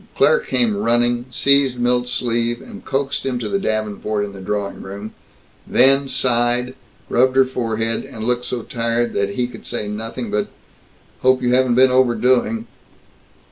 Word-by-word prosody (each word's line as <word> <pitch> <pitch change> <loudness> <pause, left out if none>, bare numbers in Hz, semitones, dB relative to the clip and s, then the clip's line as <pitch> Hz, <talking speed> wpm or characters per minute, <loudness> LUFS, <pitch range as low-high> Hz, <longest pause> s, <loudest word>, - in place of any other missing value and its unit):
Claire 485 - +4
came 240 - 0
running, 120 - +1
seized 140 0 +3
Milt's 125 0 +1
sleeve, 120 -1 -1 0.2
coaxed 135 0 -2
him 130 -2 -2
to 120 -3 -4
the 195 - -1
davenport 110 - -2
in 100 - -9
the 95 - -10
drawing 100 +1 -3
room 100 +3 -8 0.5
then 135 +2 +4
sighed, 125 -1 +1
and 130 - -13 0.3
rubbed 130 +1 +2
her 135 0 +5
forehead, 115 -3 -2
and 110 - -8
looked 125 +1 -1
so 120 -2 -3
tired 115 0 -1
that 100 0 -1
he 125 - 0
could 125 - -10
say 120 -3 -3
nothing 110 +2 -5
but, 105 0 0 0.7
"Hope 130 0 +2
you 125 0 +2
haven't 125 -1 +3
been 130 +1 +5
overdoing." 130 - +2
120 Hz, 160 wpm, -19 LUFS, 115-130 Hz, 0.7 s, her